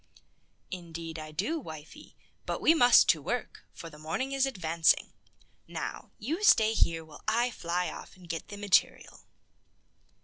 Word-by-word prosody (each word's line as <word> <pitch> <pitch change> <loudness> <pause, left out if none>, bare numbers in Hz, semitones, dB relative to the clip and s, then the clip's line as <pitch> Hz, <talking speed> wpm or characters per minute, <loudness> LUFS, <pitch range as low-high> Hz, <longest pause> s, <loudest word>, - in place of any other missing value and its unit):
"Indeed 165 -2 -7
I 155 0 -8
do, 210 - -2
wifey; 155 - -11 0.3
but - - -2
we 320 - +5
must 245 -7 +6
to - - +4
work, - - -4
for 165 - -10
the 150 -2 -13
morning 165 - -3
is 275 0 +2
advancing. 165 -8 +1 0.5
Now, - - -6
you 305 - -3
stay 220 - +5
here, 165 -6 0
while 150 -2 -14
I 235 +3 +2
fly 180 -3 -2
off - - -11
and 185 -2 -16
get 165 -1 -5
the 205 - -9
material." 205 -2 +1
180 Hz, 150 wpm, -29 LUFS, 165-240 Hz, 0.5 s, must